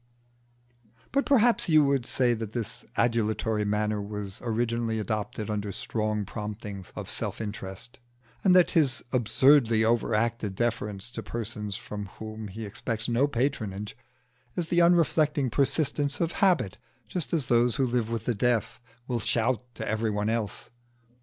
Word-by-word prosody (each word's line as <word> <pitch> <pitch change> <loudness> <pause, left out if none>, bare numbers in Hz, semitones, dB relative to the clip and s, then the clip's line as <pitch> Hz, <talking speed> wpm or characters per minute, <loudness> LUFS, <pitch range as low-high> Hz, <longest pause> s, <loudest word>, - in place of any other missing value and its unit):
But 275 +1 +1
perhaps 240 -7 +4
you 155 -2 +6
would 140 -3 +1
say 125 -2 +3
that 110 -1 -5
his 115 -4 -4
adulatory 110 -1 +1
manner 105 0 0
was 100 -1 -4
originally 115 -1 0
adopted 105 0 -3
under 105 -1 -2
strong 110 +1 -2
promptings 105 -2 -6
of - - -6
self - - -4
interest, 105 +2 -5 0.4
and 185 -2 +5
that 180 -2 +6
his 140 -6 +2
absurdly 120 -1 +4
over 115 -1 +2
acted 115 -3 0
deference 110 -2 -1
to 115 - -4
persons 105 -3 -4
from 105 +1 -6
whom 110 0 -6
he 110 +3 -6
expects 110 +2 -3
no 120 +4 +3
patronage 110 -7 -2 0.6
is 170 -2 -2
the 175 0 +4
unreflecting 155 -5 +3
persistence 145 +2 +1
of 170 -1 +1
habit 130 - +3 0.3
just 175 +7 -4
as 160 -6 0
those 120 -1 +3
who 135 - +2
live 120 -2 0
with 115 -1 -3
the 120 - +1
deaf 120 +2 0 0.3
will 120 -2 -1
shout 120 +2 +1
to 110 - -5
everybody 110 -1 0
else. 115 -3 -3
115 Hz, 145 wpm, -28 LUFS, 105-130 Hz, 0.6 s, you